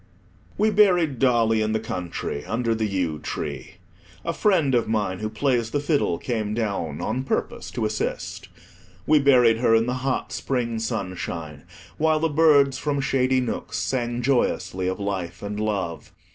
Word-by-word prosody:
We 215 +1 +3
buried 180 - +3
Dolly 115 -4 +3
in 110 0 0
the 110 - +1
country 90 -7 -4
under 115 0 0
the 110 -1 -1
yew 90 -6 -1
tree. 70 -3 -5 0.5
A - - -1
friend 165 -10 +2
of 120 -2 +2
mine 105 -4 -1
who 110 - -3
plays 120 -2 0
the 145 - -1
fiddle 145 - +1
came 110 -4 -2
down 100 -10 -2
on 125 +4 -1
purpose 135 - -3
to 115 - -2
assist. 105 0 -3 0.6
We 155 0 +5
buried 125 -5 +5
her 115 -1 +3
in 115 0 +3
the 125 - -1
hot 130 -1 -1
spring 120 -4 -2
sunshine, 85 -8 -4 0.3
while 155 0 +3
the 165 +1 +1
birds 145 -3 +4
from 145 -2 -1
shady 130 -1 +2
nooks 125 - -4
sang 120 -2 -1
joyously 115 -7 0
of 95 +3 -2
life 95 -4 -4
and 105 +1 -4
love. 100 -6 -3
115 Hz, 160 wpm, -24 LUFS, 100-135 Hz, 0.6 s, We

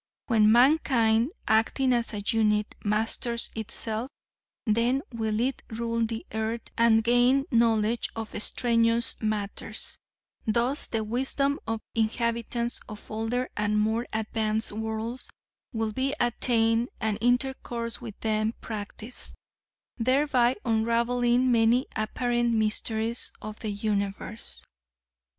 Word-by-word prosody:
When 215 -3 +4
mankind, 240 -2 +4 0.2
acting 230 +4 +3
as 235 -1 +1
a 205 -2 -5
unit, 210 -1 +2
masters 225 +3 0
itself, 220 +2 -2 0.6
then 235 +5 +2
will 220 -2 -1
it 260 +2 0
rule 230 0 -1
the 225 0 -3
earth 220 +1 -3
and 230 -1 +4
gain 245 +4 +4
knowledge 230 -1 +2
of 225 -1 -5
extraneous 230 +1 +2
matters; 210 -2 -3 0.5
thus 240 +6 +1
the 225 -1 -1
wisdom 270 +5 0
of 225 -1 -2
inhabitants 235 +1 0
of 210 -1 -10
older 225 +4 -1
and 210 0 0
more 220 +3 +1
advanced 220 0 -1
worlds 220 +3 -4 0.4
will 225 -3 -1
be 265 +5 -1
attained 230 -1 +2
and 220 -2 -1
intercourse 245 -2 0
with 225 -4 -8
them 215 0 0
practiced, 215 +2 -7 0.6
thereby 255 0 +3
unraveling 240 +2 +2
many 235 +2 +4
apparent 240 +2 0
mysteries 220 +1 -1
of 215 0 -8
the 220 - -4
universe. 200 - -3
230 Hz, 110 wpm, -27 LUFS, 220-240 Hz, 0.6 s, When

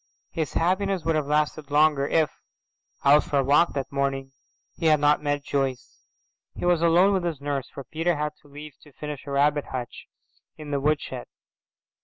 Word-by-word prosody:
His 160 -2 -3
happiness 190 +2 0
would 165 -1 +1
have 150 -2 -1
lasted 150 0 0
longer 145 -1 +3
if, 155 -3 +2 0.7
out 145 +2 +6
for 145 - -1
a 135 - +3
walk 145 +5 +3
that 135 -2 -4
morning, 135 -1 -2 0.4
he 165 - -1
had 155 -1 +5
not 150 0 +3
met 145 -1 -1
Joyce. 135 -3 -3 0.5
He - - -4
was 175 -2 +3
alone 175 +4 +4
with 190 -2 0
his 165 -5 -3
nurse, 140 -2 -3
for 140 - -9
Peter 165 +5 -1
had 150 0 -2
leave 145 +1 -11
to 150 - -18
finish 150 -1 -7
a - - -5
rabbit 145 +1 +2
hutch 125 -2 -7 0.5
in 150 -1 -8
the 140 - 0
woodshed. 145 - -1
150 Hz, 180 wpm, -25 LUFS, 140-160 Hz, 0.7 s, out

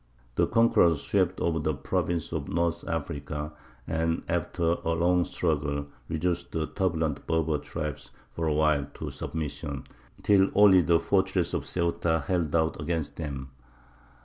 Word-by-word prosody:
The - - +2
conquerors 85 -9 +4
swept 95 +2 +1
over 80 -1 +1
the 75 -1 0
provinces 80 +4 -2
of - - -3
North 85 0 0
Africa, 75 -1 -3 0.3
and, 80 0 -1
after 85 -1 0
a 85 - +1
long 90 +2 +3
struggle, 70 -4 -1 0.2
reduced 85 +2 -1
the 80 -1 0
turbulent 80 -6 -1
Berber 80 -2 +1
tribes 75 0 -5 0.2
for 80 +5 -2
a 75 - +2
while 75 -2 +2
to - - -5
submission, 75 -3 -4 0.4
till 100 -1 +5
only 100 -3 +7
the 85 0 +4
fortress - - +1
of - - -2
Ceuta 85 -2 0
held 85 -5 0
out 80 -2 +1
against 80 -1 -2
them. 70 -4 -5
80 Hz, 145 wpm, -28 LUFS, 75-85 Hz, 0.4 s, only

